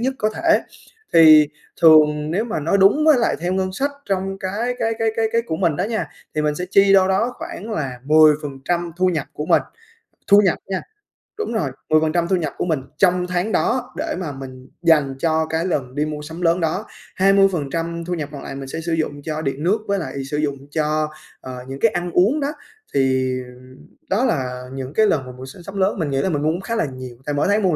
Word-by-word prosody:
nhất 260 +2 0
có 215 - +1
thể. 330 -1 +3 0.5
Thì 155 -2 +8 0.3
thường 150 -2 +6
nếu 195 +7 0
mà 220 -9 -3
nói 170 +7 +1
đúng 205 +11 +5
với 300 -5 +6
lại 230 - +1
theo 175 +1 -1
ngân 185 0 -1
sách 280 +9 -1 0.2
trong 195 0 -2
cái 215 +7 -2
cái 225 0 0
cái 225 -1 +1
cái 225 - +2
cái 230 - +2
của 160 -9 -4
mình 170 -5 +1
đó 180 - 0
nha, 220 0 -2 0.3
thì 155 - 0
mình 150 -1 +1
sẽ 180 - -3
chi 195 0 +5
đâu 190 -1 +5
đó 225 +6 +1
khoảng 225 - -7
là 135 - -3
10% 155 +2 +2
thu 185 +1 +2
nhập 160 -6 0
của 150 - -5
mình, - - +4 0.7
thu 200 +1 +8
nhập 185 - +2
nha 190 -1 -2 0.6
đúng 435 - -3
rồi, 155 -11 -1 0.2
10% 155 +2 +2
thu 190 - +2
nhập 160 -5 -2
của - - -1
mình 155 -6 0 0.2
trong 180 -1 +2
tháng 180 +4 -1
đó 250 +2 0
để 315 +1 -2
mà 165 -6 -4
mình 130 -1 -10
dành 150 -5 +3
cho 160 0 +1
cái 160 +2 -1
lần 130 -8 -2
đi 150 +1 0
mua 150 -1 -5
sắm 160 +3 -8
lớn 170 +1 +2
đó, 170 +6 -1 0.3
20% 170 -4 +1
thu 180 - -3
nhập 155 -4 -4
còn 140 - -8
lại - - -7
mình 135 0 -7
sẽ 165 +4 -5
sử 165 0 -2
dụng 150 -3 -2
cho 155 +1 -4
điện 140 0 -3
nước, 190 +6 +3
với 200 0 0
lại 140 -5 -5
sử 150 - -1
dụng 145 -2 -1
cho, 155 0 0 0.3
ờ, 130 -1 -7
những 135 +1 -7
cái 230 - +4
ăn 175 -1 -3
uống 205 - +3
đó. 285 0 -1 0.4
Thì 130 -1 +1 0.8
đó 215 +7 +2
là 125 - -2
những 135 +1 -6
cái 220 +2 +4
lần 140 -9 0
mà 130 - -8
mùa 125 +1 -10
s 130 - -11
sắm 195 0 -7
lớn 195 +1 +1
mình 155 -4 -1
nghĩ 135 0 0
là 190 - 0
mình 150 -5 -1
mua 155 +1 +2
khá 230 - -3
là 220 - +1
nhiều 130 -3 -8
tại 145 - -2
mỗi 145 - +1
tháng 205 +2 +2
mua 190 - +3
một 165 - +1
165 Hz, 235 wpm, -21 LUFS, 150-195 Hz, 0.8 s, Thì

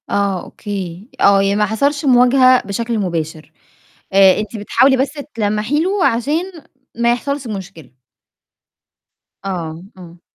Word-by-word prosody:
آه 200 -3 -1
أوكي، 195 0 -7
آه 200 -1 +5
يعني 195 0 +1
ما 210 0 +2
حصلش 280 +8 -1
مواجهة 255 0 +5
بشكل 230 +3 -2
مباشر، 160 -5 -4 0.6
آآ، 195 0 +5
أنتِ 215 +1 -5
بتحاولي 260 +6 +3
بس 265 +1 0 0.2
تلمّحي 215 +6 -1
له 380 +2 0
عشان 295 +11 0 0.4
ما 235 +1 +2
يحصلش 280 +2 -4
مشكلة. 190 - -8 1.5
آه، 170 -3 -5
إمم. 175 -1 -14
210 Hz, 120 wpm, -17 LUFS, 190-255 Hz, 1.5 s, آه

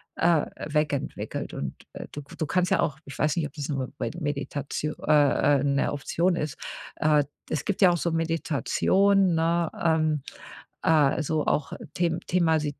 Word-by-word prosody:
äh, 165 -4 +3 0.3
weg 150 0 +2
entwickelt. 140 - -4
Und, 70 -2 -4 0.2
äh, - - -7
du 145 - -6
k - - -14
du 155 - -1
kannst 180 +1 +1
ja - - +3
auch 145 -2 -1
ich 140 - -9
weiß 150 +2 +2
nicht, 160 - +1
ob - - -17
das 150 -2 -5
nur 135 -3 -2
bei 115 - -2
Meditatio 145 0 -3
äh, 145 -1 +4
äh, - - -1
'ne 140 0 +1
Option 170 +5 0
ist, 150 -2 -3 0.4
äh 150 -1 +3 0.3
es 150 - -2
gibt 205 0 -2
ja 185 -2 +7
auch 175 - +1
so 170 0 -1
Meditation, 165 +4 +2
ne, 165 0 +1
ähm, 155 -2 +2 0.6
äh - - +1
also 155 0 +2
auch 145 -1 0 0.2
the 170 -2 +1
themas 160 -3 +2
155 Hz, 180 wpm, -26 LUFS, 145-170 Hz, 0.6 s, ja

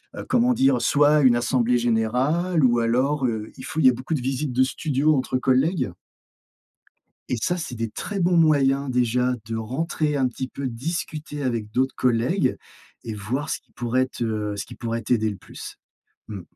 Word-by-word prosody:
heu, - - -6
comment 250 0 +3
dire? 260 +1 +3
Soit 150 +1 +4
une 130 -3 +5
assemblée 120 +1 +2
générale 125 +9 +1
ou 120 -2 +4
alors, 130 +5 +1
heu, 110 -2 -4
il 130 - -9
faut, 155 - -4
il - - +3
y - - +10
a - - +2
beaucoup 130 +6 -5
de 140 - -2
visites 135 +2 -2
de 130 +2 +4
studio 150 +2 +1
entre 130 -1 0
collègues. 130 - +1 1.4
Et 125 - 0
ça, 145 +11 -1
c'est 160 -7 -5
des 115 -1 -3
très 200 - -4
bons 175 0 +3
moyens, 140 -3 +3
déjà, 125 0 +1
de 115 0 -3
rentrer 150 +6 -2
un 135 -2 +2
petit 130 +1 -5
peu, 140 +1 -5
discuter 150 +3 -4
avec 115 -5 -2
d'autres 130 +4 0
collègues, 125 +10 +1 0.5
et 115 - -5
voir 120 +8 -3
ce - - -2
qui - - -39
pourrait 125 +2 0
te 110 -5 -3
ce 100 - -4
qui - - -10
pourrait 115 0 -3
t'aider 110 -1 +1
le 100 - -6
plus, 95 - -10 0.5
mmh. 100 -3 -6
130 Hz, 190 wpm, -24 LUFS, 115-150 Hz, 1.4 s, y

